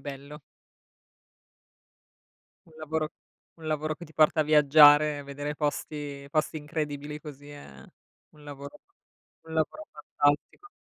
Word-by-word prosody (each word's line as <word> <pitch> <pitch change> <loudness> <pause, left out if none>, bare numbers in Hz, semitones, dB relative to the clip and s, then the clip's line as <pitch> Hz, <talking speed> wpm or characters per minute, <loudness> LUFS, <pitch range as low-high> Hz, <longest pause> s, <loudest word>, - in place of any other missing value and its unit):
bello. 140 +2 -9 2.3
Un 165 - -20
lavoro 155 0 -3 0.5
un 160 - -10
lavoro 155 0 -1
che 170 - -11
ti 160 - -16
porta 155 0 +3
a - - +4
viaggiare, 150 0 +6
vedere 145 +1 -5
posti 145 -1 -4
posti 155 +1 0
incredibili 150 -1 -5
così, 145 -2 -11
è 70 - -12 0.5
un 150 - -19
lavoro 140 -1 -10 0.6
un 160 0 -10
lavoro 160 - -2
fantastico. 145 - -1
150 Hz, 115 wpm, -27 LUFS, 145-155 Hz, 2.3 s, viaggiare